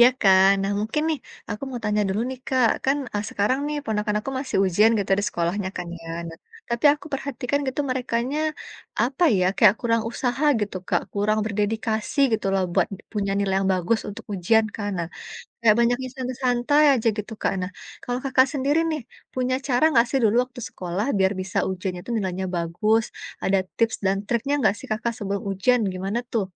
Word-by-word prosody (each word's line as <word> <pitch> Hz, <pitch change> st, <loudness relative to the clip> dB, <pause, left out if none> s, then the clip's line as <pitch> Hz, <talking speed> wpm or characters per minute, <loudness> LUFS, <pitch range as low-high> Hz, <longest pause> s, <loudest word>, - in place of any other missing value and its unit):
Ya 240 Hz, -, +9 dB
kan. 190 Hz, -1 st, +6 dB
Nah 195 Hz, +1 st, 0 dB
mungkin 220 Hz, +8 st, -1 dB
nih 315 Hz, -2 st, 0 dB, 0.3 s
aku 210 Hz, +4 st, -5 dB
mau 245 Hz, -2 st, -5 dB
tanya 210 Hz, 0 st, +1 dB
dulu 195 Hz, +3 st, -1 dB
nih 260 Hz, -, -6 dB
Kak, 255 Hz, -4 st, +3 dB
kan, 270 Hz, +2 st, +3 dB, 0.2 s
eee, 205 Hz, -, -1 dB
sekarang 210 Hz, +6 st, +1 dB
nih 300 Hz, -, -2 dB
ponakan 210 Hz, -2 st, -1 dB
aku 270 Hz, -, -5 dB
masih 265 Hz, 0 st, -3 dB
ujian 205 Hz, +5 st, +4 dB
gitu 200 Hz, -1 st, -3 dB
di -, -, -2 dB
sekolahnya 180 Hz, +3 st, -1 dB
kan 180 Hz, -, -4 dB
ya 165 Hz, -, -10 dB, 0.2 s
nah, 165 Hz, -, -10 dB, 0.3 s
tapi 235 Hz, +1 st, -3 dB
aku 295 Hz, -, -7 dB
perhatikan 275 Hz, 0 st, -2 dB
gitu 265 Hz, +2 st, -2 dB
merekanya 255 Hz, +2 st, -1 dB, 0.6 s
apa 265 Hz, +8 st, +1 dB
ya, 180 Hz, -, +2 dB
kayak 210 Hz, -2 st, +6 dB
kurang 230 Hz, -1 st, +1 dB
usaha 255 Hz, +4 st, -1 dB, 0.2 s
gitu 205 Hz, -2 st, -3 dB
Kak, -, -, +1 dB
kurang 210 Hz, +1 st, +1 dB
berdedikasi 220 Hz, +3 st, -2 dB
gitu 220 Hz, -, 0 dB
loh 190 Hz, -, +2 dB
buat -, -, +3 dB, 0.3 s
punya 200 Hz, -2 st, -1 dB
nilai 200 Hz, -1 st, 0 dB
yang 195 Hz, -, 0 dB
bagus 185 Hz, +5 st, +1 dB
untuk 205 Hz, -, -8 dB
ujian 220 Hz, +5 st, +3 dB
kan 205 Hz, -1 st, -3 dB
nah, 170 Hz, -, -2 dB, 0.5 s
kayak 220 Hz, -2 st, +5 dB
banyaknya 245 Hz, +2 st, +2 dB
santai-santai 255 Hz, +2 st, +1 dB
aja 235 Hz, -3 st, 0 dB
gitu 210 Hz, +1 st, -5 dB
Kak, -, -, +1 dB
nah 180 Hz, +1 st, -4 dB, 0.3 s
kalau 245 Hz, 0 st, -2 dB
Kakak 265 Hz, 0 st, +4 dB
sendiri 285 Hz, +2 st, +1 dB
nih 305 Hz, -3 st, -2 dB, 0.3 s
punya 255 Hz, 0 st, 0 dB
cara 250 Hz, +1 st, +2 dB
nggak 235 Hz, -4 st, +5 dB
sih 270 Hz, -, +1 dB
dulu 220 Hz, 0 st, +3 dB
waktu 250 Hz, 0 st, -11 dB
sekolah 180 Hz, +3 st, -3 dB
biar 190 Hz, 0 st, +3 dB
bisa 185 Hz, 0 st, -4 dB
ujian 185 Hz, 0 st, -3 dB
itu 175 Hz, -, -11 dB
nilainya 190 Hz, -2 st, -2 dB
bagus 195 Hz, +7 st, +1 dB, 0.4 s
ada 195 Hz, +1 st, +3 dB, 0.2 s
tips 230 Hz, -1 st, +1 dB
dan 190 Hz, +1 st, +3 dB
triknya 240 Hz, +5 st, 0 dB
enggak 205 Hz, -, +3 dB
sih -, -, -10 dB
Kakak 235 Hz, +2 st, -1 dB
sebelum 200 Hz, -2 st, -3 dB
ujian 245 Hz, +6 st, +2 dB
gimana 195 Hz, +5 st, -2 dB
tuh? 215 Hz, -5 st, +1 dB
220 Hz, 190 wpm, -24 LUFS, 195-250 Hz, 0.6 s, Ya